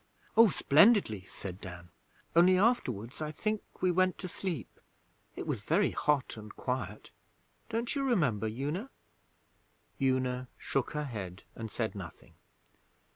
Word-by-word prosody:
'Oh, 225 -1 +8
splendidly,' 155 - +4
said 95 -1 -8
Dan. 90 -1 -9 0.5
'Only 180 +2 +7
afterwards, 130 - +1
I 155 - -2
think, 215 +7 -1 0.2
we 185 - +4
went 185 +1 +2
to 185 - -5
sleep. 175 - -5 0.6
it - - -5
was - - -2
very - - +2
hot 145 -6 0
and 105 0 -10
quiet. 110 -5 -4 0.6
Don't 235 +1 -1
you 280 - 0
remember, 150 - +2
Una?' 145 - -3 1.1
Una 130 -1 +1
shook 135 - -1
her 150 0 -2
head 95 -8 -6
and 115 -1 -6
said 110 0 -2
nothing. 95 -5 -9
135 Hz, 130 wpm, -31 LUFS, -, 1.1 s, Oh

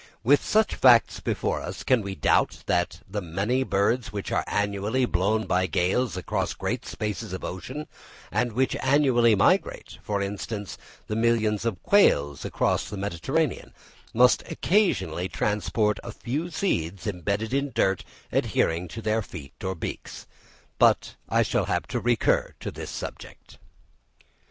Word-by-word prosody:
With 140 +5 +4
such 220 0 +2
facts 120 -3 +5
before - - -1
us, - - -6
can 130 -3 +3
we 100 -1 -5
doubt - - +1
that 90 0 0
the 100 +2 -4
many 100 +9 -1
birds 115 +1 +1
which 100 -2 -5
are - - +1
annually 105 +5 0
blown 105 +2 +1
by 95 0 +1
gales 95 - 0
across 90 - -2
great - - -3
spaces 105 -4 -4
of 95 - -5
ocean, 130 +12 -5 0.5
and 120 -2 0
which 130 +3 +1
annually 130 -5 +4
migrate—for 100 +1 0
instance, 100 +1 -5 0.3
the 105 - -3
millions 115 -2 +1
of 105 -7 -2
quails 75 - +3
across - - 0
the 105 - -6
Mediterranean—must 100 +5 0
occasionally 95 - +1
transport 105 0 0
a 120 - -6
few 145 +10 -3
seeds 95 - -2
embedded 100 +4 -2
in 140 0 0
dirt 95 -5 +1 0.3
adhering 85 +2 +1
to 115 +7 -8
their 110 +1 +1
feet 75 -8 -10
or 95 0 -2
beaks? 80 - -6 0.5
But - - +4 0.2
I - - +3
shall - - 0
have - - -1
to - - -1
recur 120 -2 +1
to - - -4
this - - -7
subject. - - -9
105 Hz, 140 wpm, -26 LUFS, 95-125 Hz, 0.5 s, facts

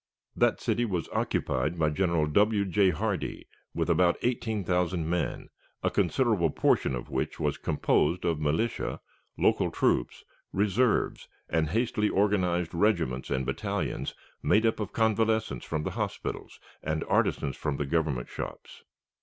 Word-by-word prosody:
That - - +2
city 120 - 0
was 90 -8 -2
occupied 65 +7 0
by 80 -2 +2
General 85 -1 +1
W. 100 +6 +3
J. 95 +1 +3
Hardee 105 0 -2 0.3
with - - 0
about 90 -1 +3
eighteen 110 -4 -1
thousand 90 -2 0
men, 85 0 -2 0.3
a - - +2
considerable 100 -2 +2
portion 65 - +2
of - - -7
which - - -2
was - - -1
composed 85 +4 +1
of 85 -3 +1
militia, 80 +10 -1 0.4
local - - +2
troops, - - 0 0.3
reserves, 105 +4 +1 0.2
and 80 -2 +1
hastily 110 +1 +1
organized 90 -4 +1
regiments 85 -9 +1
and 65 -2 -1
battalions 70 0 -2 0.3
made 110 +2 +3
up 115 - +1
of 105 -2 -3
convalescents 110 0 +1
from 80 -1 -2
the - - -2
hospitals - - -4 0.2
and 80 0 -2
artisans 70 - +1
from 75 -2 -2
the 75 - -1
Government 75 -4 0
shops. - - -8
90 Hz, 140 wpm, -28 LUFS, 80-105 Hz, 0.4 s, W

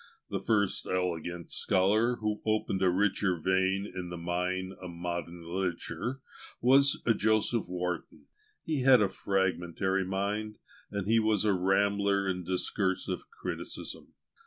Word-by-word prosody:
The 100 - -1
first 100 0 +1
elegant 85 -2 -2
scholar 110 +6 +2
who 105 -2 -2
opened 110 -3 0
a 95 - +4
richer 95 0 +1
vein 95 +3 +1
in 90 -3 -6
the 85 - -6
mine 90 +2 -2
of 90 - -6
MODERN 85 0 -5
LITERATURE 95 +9 -3 0.4
was 135 +3 +5
JOSEPH 110 -2 +2
WARTON; 90 -2 -4 0.4
he 155 -3 -1
had 130 -1 +7
a 105 - +3
fragmentary 95 -1 0
mind, 100 +3 -2 0.3
and 100 -2 -3
he 115 +2 +4
was 110 -2 +2
a 105 - +4
rambler 100 +1 +2
in 90 -1 -2
discursive 95 +1 -1
criticism. - - -6
95 Hz, 130 wpm, -30 LUFS, 90-105 Hz, 0.4 s, had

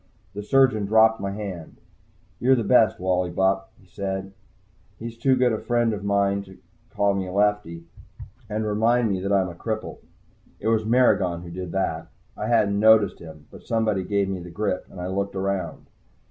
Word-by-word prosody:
The 105 - -5
surgeon 110 -2 +2
dropped 110 +1 +4
my 100 - -2
hand. 100 -5 -7 0.6
"You're 130 +2 +4
the 120 - -1
best, 110 0 +4
Wally 90 -1 0
Bupp," 95 +2 +1
he - - -22
said. 95 +1 -5 0.6
He's 115 0 -7
too 130 +3 +2
good 125 -2 +2
a 110 - -2
friend 120 -2 0
of 100 -1 -5
mine 100 0 +1
to 95 -1 -15 0.3
call 100 -1 +1
me 95 -1 -3
"Lefty" 100 -4 0 0.7
and 110 +1 -2
remind 110 +2 +2
me 95 - -1
that 100 +2 -3
I'm 95 -2 +2
a - - -8
cripple. 110 +5 -5 0.6
It - - -1
was 110 -1 +1
Maragon 95 -8 +2
who 85 - -9
did 90 0 -6
that. 80 -4 -2 0.3
I 105 - -4
hadn't 105 -4 +2
noticed 110 -2 +4
him, 80 -2 -12
but - - -14
somebody 110 -4 0
gave 100 +1 0
me 95 -1 -3
the 90 0 -9
grip, 90 +1 -3
and 90 - -11
I 90 - -4
looked 100 +2 -3
around. 95 0 -3
100 Hz, 185 wpm, -24 LUFS, 95-110 Hz, 0.7 s, dropped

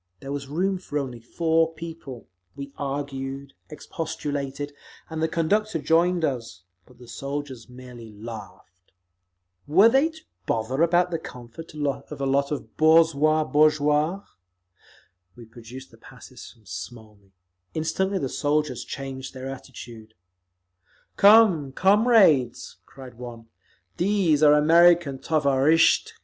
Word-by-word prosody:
There 135 - -8
was 140 -1 -5
room 185 +6 -1
for 150 -5 -5
only 130 -4 -4
four 165 +6 0
people; 160 -7 -9 0.3
we 140 0 -8
argued, 135 -1 -5 0.2
expostulated, 145 -2 -5 0.4
and 160 0 -4
the 160 - +2
conductor 200 +5 0
joined 165 +3 +2
us—but 105 - -8
the 125 0 -15
soldiers 140 -1 -6
merely 125 -3 -12
laughed. 100 -4 -12 0.7
Were 190 +10 +6
they 270 +6 +3
to 320 -1 -15 0.3
bother 120 +6 -1
about 175 +1 +2
the 165 - -2
comfort 125 +4 -11
of 145 0 -4
a 140 - -2
lot 140 +1 0
of 150 - -6
boorzhui 155 -1 +3
(bourgeois)? 150 +4 +2 1.1
We 120 - -12
produced 120 +3 -12
the - - -18
passes - - -13
from 110 -2 -25
Smolny; 100 +2 -10 0.4
instantly 190 +5 -1
the 140 - -2
soldiers 145 +3 -1
changed 135 -1 -7
their 130 +1 -6
attitude. 115 -4 -11 1.0
"Come, 200 -10 +5
comrades," 195 - +3
cried 130 -3 -13
one, 115 -2 -10 0.5
"these 180 -5 +1
are 150 -1 +7
American 165 -2 +4
_tovarishtchi. 150 +2 +2
145 Hz, 120 wpm, -24 LUFS, 125-165 Hz, 1.1 s, are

